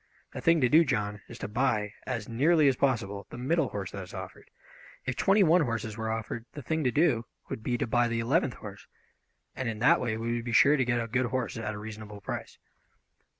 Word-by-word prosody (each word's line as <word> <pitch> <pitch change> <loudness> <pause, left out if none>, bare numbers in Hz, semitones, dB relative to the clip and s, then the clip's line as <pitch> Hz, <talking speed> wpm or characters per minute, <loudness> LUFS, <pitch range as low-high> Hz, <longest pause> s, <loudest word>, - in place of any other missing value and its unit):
The - - -5
thing 165 -1 +4
to 125 - +5
do, 160 +6 +6
John, 105 -7 -1
is - - -10
to - - -5
buy, 105 -2 0
as 115 -5 -3
nearly 150 +6 +3
as 135 - +4
possible, 105 -8 -1
the - - -9
middle 145 +4 +1
horse 100 -2 -5
that 100 - -6
is 90 - -10
offered. - - -9 0.6
If 130 - -2
twenty 195 - +4
one 170 +1 +5
horses 115 -5 -2
were 110 0 -3
offered 115 +1 -4
the 145 - -8
thing 160 +4 -1
to 125 - +3
do 145 -7 +2 0.2
would - - -5
be 120 +2 -1
to - - -1
buy 120 +1 +2
the 115 0 -1
eleventh 130 +3 +1
horse, 100 -2 -10 0.7
and 130 -3 -2
in 110 - -4
that 115 - +4
way 110 -3 -1
we 115 +1 -2
would 120 - -5
be 120 - -3
sure 140 +6 +6
to 130 -3 +1
get 120 0 +1
a 115 - -1
good 125 +2 0
horse 125 0 -2
at 110 -2 -4
a - - -6
reasonable 105 -1 -8
price." 100 - -6
120 Hz, 235 wpm, -29 LUFS, 110-135 Hz, 0.7 s, do